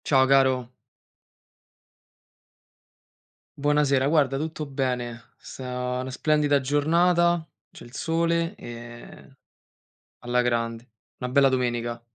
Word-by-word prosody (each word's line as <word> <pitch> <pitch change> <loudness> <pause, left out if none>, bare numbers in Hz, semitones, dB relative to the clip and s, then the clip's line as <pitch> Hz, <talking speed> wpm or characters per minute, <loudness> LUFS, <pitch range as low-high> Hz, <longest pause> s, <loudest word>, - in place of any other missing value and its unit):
Ciao 130 -2 +4
caro. 130 -2 +3 2.9
Buonasera. 145 -2 +2
Guarda, 140 -3 +2
tutto 155 +1 -4
bene. 125 -4 -4
Sta 125 -1 -5
una 130 - -5
splendida 145 +1 +1
giornata, 170 +4 +2 0.2
c'è - - -14
il 120 - -14
sole, 165 +3 0
ehm, 120 +2 -11 0.8
alla 125 0 0
grande. 115 0 -2 0.3
Una 125 0 -5
bella 135 +1 +5
domenica. 120 -2 -2
135 Hz, 95 wpm, -25 LUFS, 125-150 Hz, 2.9 s, bella